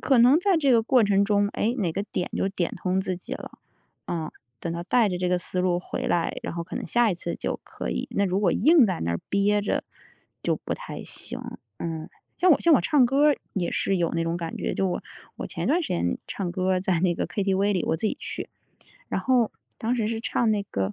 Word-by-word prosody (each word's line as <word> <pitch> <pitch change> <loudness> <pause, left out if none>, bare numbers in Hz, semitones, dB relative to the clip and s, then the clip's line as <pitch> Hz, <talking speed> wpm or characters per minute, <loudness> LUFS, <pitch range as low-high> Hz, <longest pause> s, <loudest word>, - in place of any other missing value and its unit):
可 265 -4 +3
能 250 +6 +7
在 370 0 +3
这 280 -4 +2
个 230 -2 +6
过 245 +1 +4
程 200 -1 +3
中， 205 -1 +2
诶， 230 +3 +1
哪 180 -5 +1
个 200 +5 -3
点 180 - -3
就 195 - +1
点 185 -3 -2
通 185 0 0
自 190 -2 -2
己 180 - -9
了。 - - -10 0.5
啊。 160 -2 -3 0.3
等 170 - -3
到 170 0 -4
带 225 +2 +3
着 180 - -2
这 180 - 0
个 180 - +2
思 180 +1 -3
路 180 -1 +1
回 - - -4
来， 170 -1 0
然 - - -3
后 170 - -3
可 170 - -7
能 - - -4
下 240 -3 +3
一 - - 0
次 170 0 -3
就 - - -3
可 - - -5
以。 - - -2
那 200 - +2
如 185 +1 0
果 200 -4 +2
硬 310 -3 +6
在 185 -3 -2
那 85 - -1
儿 85 - -1
憋 205 +1 +3
着 - - 0 0.6
就 - - +1
不 - - -5
太 - - -7
行， - - -4 0.4
嗯。 160 -1 -4 0.3
像 365 - +4
我 300 - +6
像 335 - +4
我 - - +6
唱 290 -5 +4
歌 275 +4 +3
儿 295 - +4 0.2
也 180 -3 -1
是 195 -2 0
有 170 -1 +1
那 165 0 0
种 165 0 -1
感 165 -1 -4
觉， - - -2
就 195 - 0
我 175 - -3 0.3
我 - - -5
前 - - -4
段 340 +4 +3
时 - - -4
间 85 +1 0
唱 190 -3 -3
歌 185 +1 -1
儿 185 - +1
在 185 -3 +1
那 175 -1 +2
个 - - -2
KTV 195 +2 +1
里， 180 - 0
我 160 - +1
自 215 - +1
己 - - -1
去。 - - -5 0.6
然 - - -1
后 250 -4 +2 0.3
当 230 +3 0
时 220 -3 0
是 225 0 -2
唱 230 0 +1
那 210 -1 +2
个， 100 - -2
195 Hz, 275 characters per minute, -26 LUFS, 175-235 Hz, 0.6 s, 能